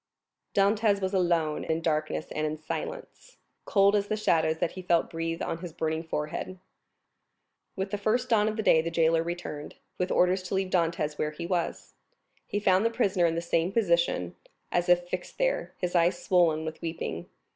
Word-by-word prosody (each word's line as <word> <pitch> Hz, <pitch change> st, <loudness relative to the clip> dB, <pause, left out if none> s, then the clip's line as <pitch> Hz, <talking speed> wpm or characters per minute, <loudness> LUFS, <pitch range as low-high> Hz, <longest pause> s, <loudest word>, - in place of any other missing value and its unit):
Dantès 205 Hz, +1 st, +3 dB
was 190 Hz, 0 st, -2 dB
alone 170 Hz, -5 st, +1 dB
in 160 Hz, 0 st, -1 dB
darkness 155 Hz, -1 st, -1 dB
and 155 Hz, 0 st, -1 dB
in 155 Hz, 0 st, -3 dB
silence—cold 200 Hz, -, -2 dB
as 205 Hz, -1 st, +1 dB
the 215 Hz, -, -1 dB
shadows 160 Hz, -6 st, +2 dB
that 165 Hz, -, -1 dB
he 185 Hz, -, -8 dB
felt 175 Hz, -2 st, +1 dB
breathe 165 Hz, 0 st, -3 dB
on 165 Hz, -, -3 dB
his 175 Hz, -1 st, -7 dB
burning 160 Hz, -1 st, -1 dB
forehead. 160 Hz, +3 st, -4 dB, 1.2 s
With 190 Hz, 0 st, -3 dB
the 205 Hz, -, -2 dB
first 235 Hz, +5 st, +1 dB
dawn 215 Hz, -3 st, +4 dB
of 215 Hz, -, -1 dB
day 160 Hz, -, +5 dB
the 165 Hz, -, -3 dB
jailer 165 Hz, 0 st, +3 dB
returned, 170 Hz, -3 st, -5 dB, 0.2 s
with 180 Hz, 0 st, 0 dB
orders 180 Hz, +1 st, +3 dB
to 195 Hz, -, -2 dB
leave 190 Hz, -1 st, -1 dB
Dantès 165 Hz, -4 st, 0 dB
where 150 Hz, -, 0 dB
he 155 Hz, +3 st, -7 dB
was. 175 Hz, -1 st, -2 dB, 0.5 s
He 205 Hz, -, -1 dB
found 190 Hz, -1 st, +3 dB
the 230 Hz, -, +3 dB
prisoner 195 Hz, -7 st, +2 dB
in 165 Hz, -, -1 dB
the 170 Hz, -, -1 dB
same 170 Hz, +1 st, 0 dB
position, 170 Hz, -, +1 dB, 0.4 s
as 175 Hz, 0 st, 0 dB
if 175 Hz, 0 st, +4 dB
fixed 180 Hz, 0 st, -5 dB
there, -, -, -1 dB
his 180 Hz, -1 st, -3 dB
eyes 175 Hz, 0 st, +2 dB
swollen 165 Hz, -4 st, +3 dB
with 160 Hz, 0 st, -6 dB
weeping. 160 Hz, -, -4 dB
175 Hz, 180 wpm, -28 LUFS, 160-195 Hz, 1.2 s, day